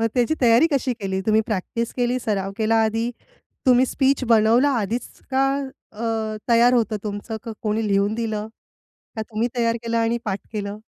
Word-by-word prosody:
मग 225 - +2
त्याची 250 +5 +2
तयारी 240 +5 +5
कशी 265 -2 +1
केली? 190 -1 -2
तुम्ही 220 0 +4
प्रॅक्टिस 225 +3 -3
केली, 245 +1 +1
सराव 195 -4 -1
केला 225 0 +2
आधी 225 +2 -1 0.6
तुम्ही 255 0 +5
स्पीच 270 0 +1
बनवला 230 +4 +4
आधीच 225 +5 -3 0.2
का 265 +1 +2 0.5
अ, 215 - -12 0.5
तयार 235 +1 +5
होतं 225 -2 +1
तुमचं 205 +2 -4
का 230 - -5
कोणी 215 0 0
लिहून 200 +1 +1
दिलं? 220 -2 -3 0.7
का 220 - -2
तुम्ही 220 +2 -2
तयार 230 -1 +1
केलं 230 0 -2
आणि 230 +1 +1
पाठ 200 -2 -2
केलं? 205 0 -4
225 Hz, 170 wpm, -22 LUFS, 215-240 Hz, 0.7 s, तयारी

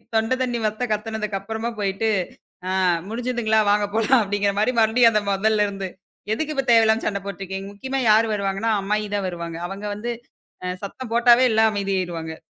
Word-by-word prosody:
தொண்டை 225 +3 +2
தண்ணி 240 -2 -2
வத்த 215 +4 -1
கத்துனதுக்கு 210 -2 -3
அப்புறமா 225 +3 -4
போயிட்டு, 200 +2 0 0.6
"அ - - -1 0.4
முடிஞ்சதுங்களா? 235 -2 0
வாங்க 205 0 +2
போலாம்" 225 +4 +4
அப்படிங்கிற 200 0 0
மாதிரி 250 +4 +2
மறுபடியும் 230 +1 +5
அந்த 210 -2 +1
முதல்ல 210 +1 +2
இருந்து. 195 -2 -5 0.4
"எதுக்கு 305 +6 -2
இப்ப 270 -1 -1
தேவையில்லாம 225 -1 +4
சண்டை 200 -1 -2
போட்டுருக்கீங்க?" 195 0 -6
முக்கியமா 265 +5 -3
யாரு 220 +2 +5
வருவாங்கன்னா 200 +2 -1
அம்மாயிதான் 205 -1 -1
வருவாங்க, 170 -1 -6
அவங்க 195 +2 -7
வந்து 235 +3 -4 0.5
அ - - -2 0.2
சத்தம் 230 +4 -7
போட்டாவே 240 +1 +6
எல்லாம் 220 0 +4
அமைதி 200 -1 -2
ஆயிடுவாங்க. 165 -3 -4
215 Hz, 165 wpm, -22 LUFS, 195-230 Hz, 0.6 s, போட்டாவே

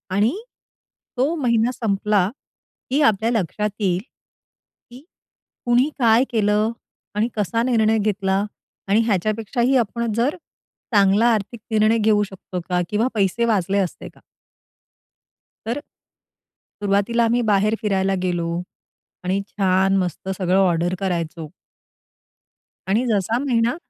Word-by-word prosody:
आणि 215 - +2 0.8
तो 280 +6 +1
महिना 240 -4 +1
संपला, 205 -4 +1 0.6
की 280 +4 +1
आपल्या 225 -3 +3
लक्षात 210 0 -1
येईल, 185 -3 +1 0.9
की 250 +4 -13 0.6
कुणी 245 +4 +3
काय 230 +1 +5
केलं 210 0 +2 0.4
आणि 215 +3 +1
कसा 225 +3 0
निर्णय 225 -3 +2
घेतला 200 -1 0 0.4
आणि 205 +3 +3
ह्याच्यापेक्षाही 220 +5 0
आपण 235 0 -1
जर 245 - +1 0.6
चांगला 200 +3 +4
आर्थिक 215 +2 -3
निर्णय 220 +1 +3
घेऊ 210 -1 +3
शकतो 190 -2 -7
का? 180 0 +1
किंवा 220 +4 +1
पैसे 205 +4 +1
वाचले 200 -3 +1
असते 185 -3 -3
का?" - - -23 1.4
तर 240 +5 -2 1.0
सुरुवातीला 205 +4 +1
आम्ही 235 +2 +2
बाहेर 210 +2 +2
फिरायला 195 -2 +1
गेलो 175 -2 -1 0.8
आणि 190 +2 0
छान 190 0 +2
मस्त 180 0 -3
सगळं 185 0 +2
ऑर्डर 175 -1 +2
करायचो. 170 -4 -3 1.4
आणि 220 +6 +1
जसा 220 +1 +1
महिना 240 -4 +1
210 Hz, 115 wpm, -21 LUFS, 195-230 Hz, 1.4 s, काय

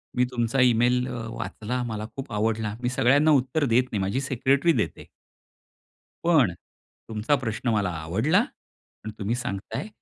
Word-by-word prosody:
मी 125 - +3
तुमचा 120 +2 0
इमेल 125 +1 +3
अ, 120 -3 -5
वाचला, 115 +1 -4
मला 110 -2 -4
खूप 135 -3 -7
आवडला, 110 0 -1
मी 125 - 0
सगळ्यांना 135 +4 +4
उत्तर 140 +2 +2
देत 125 +1 +3
नाही, 105 -3 -1
माझी 100 +8 -1
सेक्रेटरी 135 +5 +2
देते." - - -9 1.2
पण 150 - +4 0.6
तुमचा 110 +7 +1
प्रश्न 120 -1 -3
मला 105 -4 +1
आवडला 90 - +1
आणि 110 - -8
तुम्ही 105 +4 -1
सांगताय, 115 - -4
120 Hz, 145 wpm, -25 LUFS, 110-130 Hz, 1.2 s, सगळ्यांना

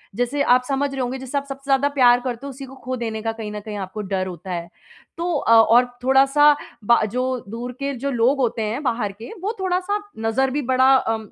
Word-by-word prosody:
जैसे 245 +5 -1
आप 250 -2 +4
समझ 280 +1 0
रहे 270 -1 -3
होंगे 250 +1 -2
जैसे 265 +2 -4
आप 280 - -2
सबसे 275 -1 -8
ज़्यादा 270 +1 +3
प्यार 245 -2 +6
करते 245 0 -5
हो - - -5
उसी 270 0 -8
को 265 0 -12
खो 255 +2 -3
देने 225 -2 -4
का 225 +1 -1
कहीं 225 -2 -7
न 210 - -5
कहीं 210 0 -7
आपको 195 +2 -5
डर 190 -2 -2
होता 180 +1 -8
है। 170 -1 -4 0.5
तो 345 +1 -1
अ, 250 - 0
और 230 +2 +6 0.2
थोड़ा-सा 275 +3 +5 0.4
ब 235 - +6
जो 250 +2 -1 0.3
दूर 235 +3 -5
के 280 0 -2
जो 280 - 0
लोग 245 +3 +2
होते 240 -3 0
हैं 220 +5 -2
बाहर 230 -6 -1
के 220 +4 -11
वो 410 +4 -2
थोड़ा-सा 375 +2 -1 0.3
नज़र 265 +4 +1
भी 290 +3 -1
बड़ा 260 0 +4
अ, 225 -3 +1
250 Hz, 235 wpm, -22 LUFS, 225-275 Hz, 0.5 s, प्यार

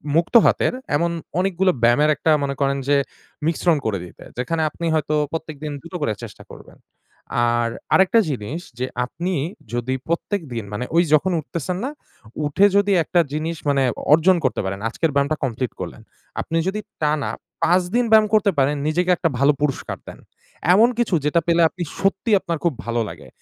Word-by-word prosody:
মুক্ত 170 +8 +1
হাতের, - - +2 0.2
এমন 170 +3 +1 0.3
অনেকগুলো 190 0 +2
ব্যায়ামের 120 +6 +4
একটা 160 - +1
মনে 140 0 -2
করেন 140 0 +1
যে 145 0 +4 0.5
মিশ্রণ 165 0 +2
করে 110 -3 0
দিতে, 90 - -14
যেখানে 160 +6 -1
আপনি 170 +2 -6
হয়তো 155 -1 0 0.2
প্রত্যেকদিন 155 -2 -5
দুটো 170 +2 -10
করে 110 -7 0
চেষ্টা 105 -4 -10
করবেন - - -14 0.8
আর 120 0 +1 0.2
আরেকটা 190 +4 +5
জিনিস 135 +5 -4 0.2
যে 130 - 0 0.2
আপনি 175 +9 -4 0.4
যদি 120 +2 -1
প্রত্যেক 175 +4 -1
দিন 115 -2 -3
মানে 115 +4 -3
ওই 170 - +6
যখন 155 +5 +4
উঠতেছেন 170 +3 -4
না, - - -2 0.6
উঠে 150 +7 +3
যদি 200 0 +3
একটা 175 - +1
জিনিস 160 +2 -2
মানে 140 -1 +2 0.3
অর্জন 170 +4 +5
করতে 130 - 0
পারেন, 95 +1 -3
আজকের 160 +6 -1
ব্যায়ামটা 140 +2 +1
কমপ্লিট 125 -1 -2
করলেন, - - -6 0.4
আপনি 165 - -2
যদি 200 +3 -1 0.2
টানা 150 -1 +1 0.3
৫ 180 +2 +4
দিন 245 0 +3
ব্যায়াম 215 -1 +6
করতে 210 -2 +4
পারেন 140 +2 +2
নিজেকে 175 +4 0
একটা 165 - +1
ভালো 140 +2 +5
পুরষ্কার 145 -3 -2
দেন, - - -10 0.5
এমন 220 +5 +6
কিছু 235 -5 0
যেটা 150 +3 +3
পেলে 170 0 +3
আপনি 180 +1 -5 0.2
সত্যিই 195 +3 +2
আপনার 170 -3 -3
খুব 170 -3 +2
ভালো 115 0 0
লাগে। - - -11
160 Hz, 175 wpm, -21 LUFS, 140-180 Hz, 0.8 s, ওই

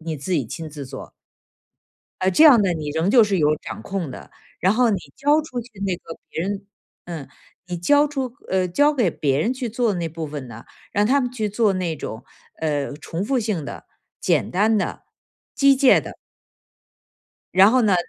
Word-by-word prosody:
你 160 -1 -4
自 140 +7 -5
己 145 -9 +1
亲 160 +8 -6
自 145 -2 -8
做。 130 0 -9 1.1
呃， 185 0 +2
这 250 - +5
样 270 -7 +8
呢， 190 -3 +1
你 155 -2 -4
仍 160 +5 0
旧 235 -1 +7
是 200 -2 0
有 150 -1 +3
掌 - - -8
控 190 -7 -4
的， - - -10 0.3
然 190 - +3
后 245 0 +3
你 200 - +1 0.2
交 290 +2 +3
出 255 -5 -6
去 245 - -17
那 190 -3 -1
个 165 - -11
别 160 - -3
人 200 +1 -4 0.4
嗯， 165 -5 -6 0.4
你 180 -1 -4
交 290 - +4
出 265 -4 -4 0.2
呃， 185 -1 +1
交 290 +12 +3
给 240 - +1
别 140 -3 0
人 225 +10 +1
去 255 -2 -4
做 235 0 +1
的 - - -3
那 170 - -2
部 160 0 -6
分 145 -3 -6
呢， 115 -1 -11 0.3
让 205 +1 +2
他 270 +5 +3
们 250 -2 -2
去 220 -4 -2
做 210 0 +2
那 180 -4 -2
种， 110 -5 -7 0.4
呃， 145 -3 -1
重 165 +5 -5
复 265 +4 +1
性 210 -9 -2
的、 - - -8 0.4
简 - - +1
单 215 +4 +2
的、 200 - -2 0.5
机械 275 -1 +5
的。 - - -8 1.4
然 190 +3 +7
后 255 +1 +3
呢， 205 -4 +3
190 Hz, 215 characters per minute, -22 LUFS, 160-240 Hz, 1.4 s, 样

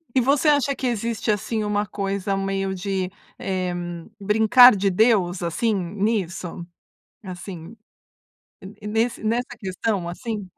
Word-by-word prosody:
E 255 - +5
você 280 +4 +2
acha 285 -2 +3
que 265 - -5
existe, 230 -2 -1
assim, 215 +2 -1
uma 210 0 -1
coisa 195 0 -2
meio 195 0 -2
de, 190 -1 -2 0.3
eh, 185 -2 -2 0.5
"brincar 220 +4 +7
de 195 0 +1
Deus", 190 -3 +2
assim, 175 +7 0
nisso? 190 -2 -2 0.6
Assim, 180 0 -8 0.9
en 210 +2 -9
nesse 225 +2 0
nessa 235 +3 -1
questão, 190 -2 -2
assim? 210 +1 -5
205 Hz, 125 wpm, -23 LUFS, 190-225 Hz, 0.9 s, brincar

